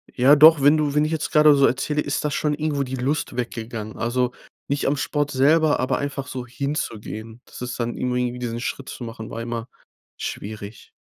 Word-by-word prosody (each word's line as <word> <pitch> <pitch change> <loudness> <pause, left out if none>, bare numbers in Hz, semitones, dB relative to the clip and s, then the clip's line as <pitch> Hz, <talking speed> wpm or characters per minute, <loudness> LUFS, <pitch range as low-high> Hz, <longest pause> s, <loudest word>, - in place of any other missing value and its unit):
Ja 135 +4 +6
doch, 155 0 +8
wenn 145 +2 +6
du 145 -2 0
wenn 150 - +4
ich 155 - -2
jetzt 160 -1 -2
grade 150 -1 +7
so 140 -1 +5
erzähle, 150 +4 0
ist 145 +2 -2
das 150 -1 -1
schon 150 +1 0
irgendwo 150 -2 -1
die 130 0 -4
Lust 135 +4 -2
weggegangen. 115 -3 -5
Also, 125 +1 0 0.4
nicht 140 0 0
am 140 - +2
Sport 145 0 -1
selber, 150 +3 +3
aber 130 - 0
einfach 140 -1 -4
so 125 -2 -5
hinzugehen. 115 -4 -5
Das - - -12
ist 125 0 -5
dann 120 0 -2
irgendwie 125 -1 -1
diesen 120 -1 -3
Schritt 130 +2 -4
zu 125 - -7
machen, 115 -1 -7
war 115 - -5
immer 115 0 -4 0.5
schwierig. 105 0 -7
130 Hz, 200 wpm, -23 LUFS, 120-145 Hz, 0.5 s, doch